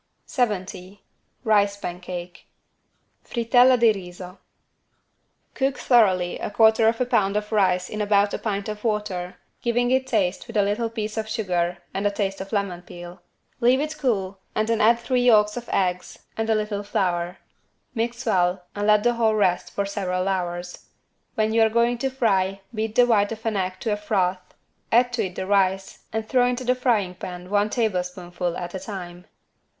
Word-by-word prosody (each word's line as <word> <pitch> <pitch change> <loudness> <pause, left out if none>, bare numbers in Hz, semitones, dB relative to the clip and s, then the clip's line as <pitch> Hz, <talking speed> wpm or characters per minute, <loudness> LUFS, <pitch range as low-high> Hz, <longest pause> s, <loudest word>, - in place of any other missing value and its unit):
70 200 -4 -3 0.4
RICE 205 -3 +3
PANCAKE 180 -1 -7 0.8
(Frittelle 245 +2 +4
di 230 -1 +6
riso) 180 -1 -9 1.1
Cook 270 -1 0
thoroughly 190 -8 +3
1/4 220 +1 +4
lb. 210 -5 +1
of 210 +1 -2
rice 185 -4 +2
in 215 - -4
about 205 -1 +2
a - - -2
pint 200 -2 -3
of 210 -1 -6
water 210 -5 -2 0.3
giving 245 +1 +1
it 260 0 +2
taste 200 -7 0
with 230 -2 -4
a 205 - +4
little 210 +3 -1
piece 220 -1 -5
of 220 0 -3
sugar 180 -5 -1 0.2
and 200 +1 0
a - - +3
taste 195 -1 -3
of 195 - -8
lemon 200 -4 -2
peel. 175 0 -11 0.4
Leave 250 +2 +4
it 305 +2 -2
cool 195 -7 -1 0.2
and 215 0 +1
then 230 0 +1
add 230 +2 +5
three 245 +1 0
yolks 210 -4 +4
of 240 -1 -7
eggs 180 -2 -1 0.2
and 225 0 -2
a 220 - +4
little 210 -1 -2
flour. 180 -3 -1 0.6
Mix 235 +1 -3
well 180 -4 +1
and 205 0 -1
let 210 -1 +5
the 240 - +3
whole 225 -2 +2
rest 180 -4 +1
for 200 - -2
several 185 -2 -2
hours. 175 -2 -3 0.5
When 220 0 +1
you 225 - +4
are 220 - +5
going 235 +1 +1
to 270 - 0
fry 195 -7 0
beat 220 0 -3
the 245 - +6
white 210 -3 +2
of 220 +1 -12
an 225 -2 0
egg 185 -1 -1
to 220 - 0
a - - -2
froth, 185 -3 -1 0.4
add 240 +2 +6
it 245 - -17
to 220 -5 -1
the 185 +1 -5
rice 195 -1 +1
and 220 0 -3
throw 250 0 +3
into 250 +1 -2
the 250 0 +2
frying 230 -8 0
pan 180 +1 -8
one 205 +1 +2
tablespoonful 180 -5 -2
at 175 -1 -6
a 190 - -4
time. 180 -3 -8
205 Hz, 175 wpm, -24 LUFS, 185-230 Hz, 1.1 s, di